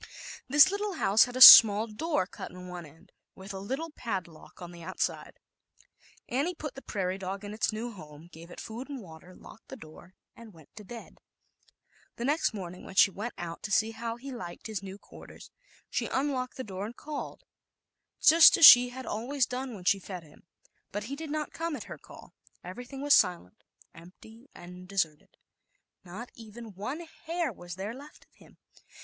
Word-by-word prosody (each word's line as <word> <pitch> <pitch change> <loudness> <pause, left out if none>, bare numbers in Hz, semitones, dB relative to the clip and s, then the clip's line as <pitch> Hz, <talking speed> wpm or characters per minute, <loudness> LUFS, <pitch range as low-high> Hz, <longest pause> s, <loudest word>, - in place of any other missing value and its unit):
This 290 +6 +6
lit 405 - -3
tle 415 -1 -3
house 215 - +3
had 245 -1 -10
a 255 - -3
small 215 -3 +11
door 230 - -2
cut - - -9
in 180 0 -11
one 175 -2 -8
end, 160 +3 -21 0.2
with 195 +1 -10
a 190 - -6
little 270 +11 -5
padlock 185 - -7
on 175 -1 -9
the 170 -1 -13
out 185 +3 -9
side. - - -3 0.9
Annie 290 +9 -2
put 300 -3 -7
the 270 - -11
prairie 190 -5 -4
dog 195 +1 -6
in 205 - -7
its 215 - -1
new 225 +3 -5
home, 155 -5 -13
gave 165 +2 -13
it - - -11
food 235 +5 -8
and 280 -2 -6
water, 175 -2 -14
locked 220 - -16
the - - -9
door 175 -3 -15 0.2
and 225 -3 -14
went 160 -3 -20
to 210 - -11
bed. 230 +3 -12 1.0
The 235 - -5
next 300 +4 +1
morning 180 -4 -8
when 190 - -11
she 195 - +5
went 215 +6 -6
out 170 -1 -7
to 215 - -7
see 220 +2 +2
how 230 +1 -5
he 270 +3 -10
liked 180 -9 -9
his 215 -3 -5
new 195 0 -9
quarters, - - -15 0.4
she - - -3
unlocked 260 -2 -2
the 260 - -5
door 195 -1 -6
and 240 - -12
called, 300 -1 -7 0.8
just 330 +1 +7
as 330 - +8
she 245 -2 +10
had 260 +1 -9
always 250 +4 -1
done 255 0 -6
when 185 - -11
she 195 +2 +2
fed 185 -2 -9
him, 155 +2 -21 0.4
but 205 +1 -4
he 265 +6 -6
did 315 +1 -8
not 305 0 -4
come 330 -1 -4
at - - -7
her - - -10
call. - - -15 0.3
Everything 245 +9 -9
was 290 0 +4
silent, 175 - +1 0.3
empty 220 +9 -16
and 180 +1 -12
deserted; 175 -6 -3 0.7
not 195 +7 -10
even 225 -1 -12
one 255 - -6 0.2
hair 330 -5 -2
was 175 -2 -10
there 195 +4 -6
left 285 +4 -14
of - - -42
him. - - -21
215 Hz, 195 wpm, -28 LUFS, 185-260 Hz, 1.0 s, small